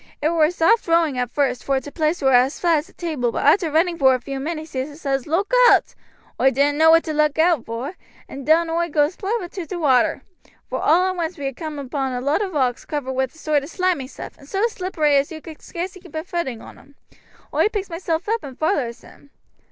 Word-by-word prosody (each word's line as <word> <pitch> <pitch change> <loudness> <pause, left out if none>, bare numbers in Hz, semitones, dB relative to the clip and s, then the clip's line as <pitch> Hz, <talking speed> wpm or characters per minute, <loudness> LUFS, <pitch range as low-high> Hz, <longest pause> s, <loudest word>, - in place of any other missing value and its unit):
It 300 - +1
war 320 -2 +3
soft 355 +6 +2
rowing 330 -6 +2
at 245 -1 -1
first, 255 -2 -1
vor 270 -1 +1
t' 285 +2 -10
place 310 0 -1
war 265 -1 +4
as 250 +3 +3
flat 335 -3 +3
as 300 - -9
a - - -21
table, 300 -9 -2
but - - -2
arter 330 +3 +4
running 335 +3 +1
vor 265 -1 +5
a - - 0
vew 270 +2 -6
minutes 315 +2 -5
he 270 +3 -4
says, 275 -4 -2
'Look 375 +9 -1 0.2
owt!' - - +3 0.5
Oi 265 - +6
didn't 285 +3 +1
know 320 0 +6
what 330 +1 +6
to 315 - -4
look 300 -1 +1
owt 325 -5 +2
vor, 235 +8 -4 0.3
and 275 - -8
down 325 +4 +3
oi 340 +1 0
goes 295 +2 +1
plump 420 +2 -2
into 350 -1 -7
t' 365 - -5
water. 270 -8 +2 0.5
Vor - - -2
all 350 +4 +4
at - - -6
once 340 0 -3
we 285 - -5
had 270 -2 -3
coomed 310 0 -6
upon 265 0 -2
a 250 - -2
lot 285 +8 +1
o' 400 - -1
rocks 260 -8 -1
covered 290 -3 -4
wi' 265 0 +1
a - - -15
sort 310 0 -1
of 285 - -8
slimy 355 -7 -1
stuff, - - -10
and 280 - -16
so 395 +3 +1
slippery 365 -9 0
as 275 +3 0
you 320 - -7
could 315 0 -12
scarce 355 +2 -5
keep 360 -4 -14
a 315 - -2
footing 340 -11 -4
on - - -13
'em. 280 - -21 0.6
Oi - - +3
picks 405 -4 -4
myself 330 0 -2
up 450 +1 0
and 265 -2 -9
vollers 285 -8 -1
him. 285 - -18
310 Hz, 245 wpm, -21 LUFS, 275-340 Hz, 0.6 s, Oi